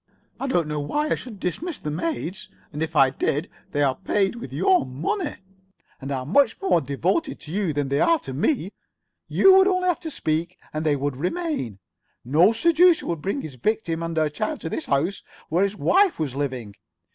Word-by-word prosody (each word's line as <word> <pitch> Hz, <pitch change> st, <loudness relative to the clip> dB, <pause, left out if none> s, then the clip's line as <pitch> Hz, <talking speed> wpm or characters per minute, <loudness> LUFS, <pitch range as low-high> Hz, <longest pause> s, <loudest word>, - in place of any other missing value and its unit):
I 275 Hz, -, -2 dB
do 175 Hz, -10 st, +2 dB
not -, -, -10 dB
see 150 Hz, -, -3 dB
why 300 Hz, +1 st, 0 dB
I -, -, +3 dB
should 225 Hz, -6 st, -7 dB
dismiss 305 Hz, -, -3 dB
the 150 Hz, -, -5 dB
maids, 185 Hz, -, -3 dB, 0.2 s
and 150 Hz, -, -5 dB
if 160 Hz, 0 st, -3 dB
I 135 Hz, -2 st, +5 dB
did 145 Hz, +4 st, -1 dB, 0.2 s
they 145 Hz, -1 st, +1 dB
are 135 Hz, -2 st, +3 dB
paid 195 Hz, -2 st, 0 dB
with 235 Hz, -, -8 dB
your 180 Hz, +5 st, +3 dB
money, 165 Hz, -, -3 dB, 0.7 s
and 135 Hz, +1 st, -5 dB
are 130 Hz, -2 st, -2 dB
much 275 Hz, -, +3 dB
more 380 Hz, -, +2 dB
devoted 175 Hz, -, -1 dB
to 150 Hz, -, -9 dB
you 195 Hz, -2 st, 0 dB
than 145 Hz, -2 st, -2 dB
they 140 Hz, +1 st, +1 dB
are 335 Hz, -, +4 dB
to 135 Hz, -, -7 dB
me. 195 Hz, -, 0 dB, 0.6 s
You 385 Hz, -, +6 dB
would 385 Hz, 0 st, +6 dB
only 365 Hz, -1 st, +1 dB
have 355 Hz, -, 0 dB
to 330 Hz, -, -6 dB
speak 170 Hz, -, -2 dB, 0.2 s
and 155 Hz, +1 st, -2 dB
they 150 Hz, -2 st, +2 dB
would 140 Hz, -1 st, -2 dB
remain. 180 Hz, -, -2 dB, 0.5 s
No 155 Hz, -, +5 dB
seducer 335 Hz, +8 st, +4 dB
would 165 Hz, -3 st, -3 dB
bring 200 Hz, -, -2 dB
his 150 Hz, -, -7 dB
victim 165 Hz, -, -1 dB
and 165 Hz, -1 st, -4 dB
her 155 Hz, -1 st, +3 dB
child 275 Hz, -, -3 dB
to 165 Hz, -, -4 dB
the -, -, -3 dB
house 155 Hz, +7 st, 0 dB, 0.3 s
where 175 Hz, +5 st, +2 dB
his 200 Hz, +1 st, 0 dB
wife 385 Hz, -, +3 dB
was 150 Hz, -5 st, -2 dB
living. 130 Hz, -7 st, -3 dB
170 Hz, 205 wpm, -24 LUFS, -, 0.7 s, You